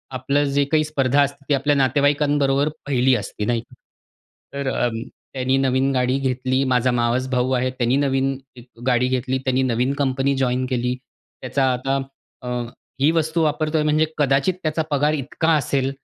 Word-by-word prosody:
आपलं 140 +3 +1
जे 140 0 +3
काही 155 -1 +3
स्पर्धा 145 -2 +1
असते, 140 0 -2
ती - - +3
आपल्या 145 +2 +2
नातेवाईकांबरोबर 145 +1 +2 0.2
पहिली 130 -2 +3
असती 105 -1 -4
नाही 120 +1 0
का? - - -22 0.8
तर 140 -1 -2 0.6
त्यांनी 130 0 0
नवीन 135 0 +1
गाडी 130 0 +1
घेतली. 130 0 0
माझा 130 -1 +2
मावस 120 +1 0
भाऊ 125 0 0
आहे. 130 0 +1
त्यानी 125 0 0
नवीन 135 -1 +1 0.5
गाडी 125 0 +3
घेतली. 130 0 -1
त्यांनी 130 0 0
नवीन 125 +1 0
कंपनी 135 0 +1
जॉइन 130 -1 0
केली. 125 -1 -1 0.5
त्याचा 135 -1 0
आता 135 +2 -1 0.4
अ, 125 - -5 0.5
ही 140 +3 +4
वस्तू 165 0 0
वापरतोय 155 0 0
म्हणजे 155 +1 +3
कदाचित 140 +4 +2
त्याचा 155 0 0
पगार 145 +1 +2
इतका 155 +3 -2
असेल. 135 -2 0
135 Hz, 155 wpm, -21 LUFS, 130-145 Hz, 0.8 s, ही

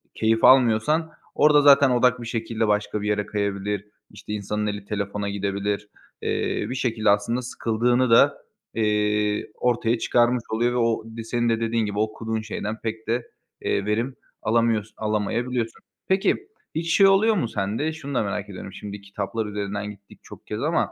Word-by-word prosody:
keyif 115 0 +1
almıyorsan 130 +6 +4 0.2
orada 150 -1 +5
zaten 140 -1 +7
odak 125 0 +3
bir 115 - -6
şekilde 115 -1 -1
başka 105 0 0
bir 105 - -3
yere 105 -1 0
kayabilir. 100 -1 -2 0.3
İşte, 105 +1 -8
insanın 105 +1 -2
eli 105 -1 -4
telefona 100 0 -3
gidebilir. 100 +1 -2 0.3
Eee, - - -1
bir 130 - -3
şekilde 115 -4 0
aslında 105 +5 +2
sıkıldığını 120 +1 +1
da, 115 - +6 0.4
eee, 105 -1 0
ortaya 120 -1 +1
çıkarmış 120 +1 +2
oluyor 120 +2 +1
ve - - -1
o 115 -2 +1
di 115 - -4
senin 120 +1 0
de 115 -1 +1
dediğin 115 0 0
gibi, 105 0 -3
okuduğun 110 +1 -2
şeyden 110 0 -4
pek 110 0 -4
de, 120 +1 -1 0.3
eee, 100 - 0
verim 115 +5 -1 0.3
alamıyors 115 -1 +1
alamayabiliyorsun. 115 +3 -2 0.3
Peki, 190 +1 +3 0.4
hiç 165 +1 0
şey 195 - +7
oluyor 210 +3 +4
mu 170 - 0
sende? 110 +10 -2
Şunu 140 -3 -7
da - - +2
merak 105 0 -3
ediyorum. 95 -1 -8
Şimdi, 100 0 -8
kitaplar 100 +2 -4
üzerinden 105 0 -4
gittik 100 -1 -16
çok - - -13
kez - - -4
ama, - - +1
110 Hz, 165 wpm, -24 LUFS, 105-120 Hz, 0.4 s, zaten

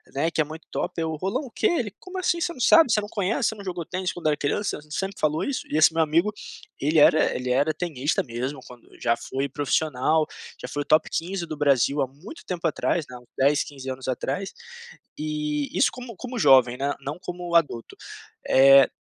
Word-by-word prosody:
né, 160 +4 +1
que 160 - +1
é - - +3
muito 160 +2 -10
top", - - -3
eu 160 -1 -1
"Roland 195 - -2
o 240 - -11
quê?". - - +1
Ele: 245 - 0
"Como 370 0 -9
assim 345 -2 0
você 340 - 0
não 260 - -11
sabe, 290 0 +6
você 215 - +4
não 205 - -5
conhece, 205 0 0
você 220 - -5
não 200 - -10
jogou 175 -3 -4
tênis 185 0 -3
quando 175 - -10
eu 155 - +4
era 145 - -1
criança, 150 +7 -1
sempre 195 +5 -4
falou 155 +1 +1
isso?". 280 - -3
E 150 - 0
esse 160 +1 +6
meu 165 - +2
amigo, 170 +7 +2 0.5
ele 155 +3 +1
era 155 +1 +5
ele 125 0 -2
era 145 +4 +2
tenista 155 -4 -1
mesmo 130 +3 -4
quando 125 -1 -15
já 115 -2 +2
foi 135 +3 -3
profissional, 150 +2 +1 0.3
já 125 - -6
foi 145 +3 -3
o - - -4
top 155 +2 +3
15 175 +1 -2
do 155 - -6
Brasil 140 0 +2
há 130 - +1
muito 160 - -12
tempo 175 -2 -5
atrás, 160 0 -1
né, 125 - -10
uns 120 - -23
10, 140 +2 +3
15 135 -2 -10
anos 130 0 -5
atrás, 135 +8 -2 0.7
e 150 -1 -2
isso - - +4
como 245 -3 -9
como 250 +2 -6
jovem, 125 -6 +5
né, 140 +1 -1
não 145 +5 -5
como 175 -1 -6
adulto, 145 -8 +1 0.5
eh 135 0 +7
155 Hz, 220 wpm, -25 LUFS, 140-185 Hz, 0.7 s, eh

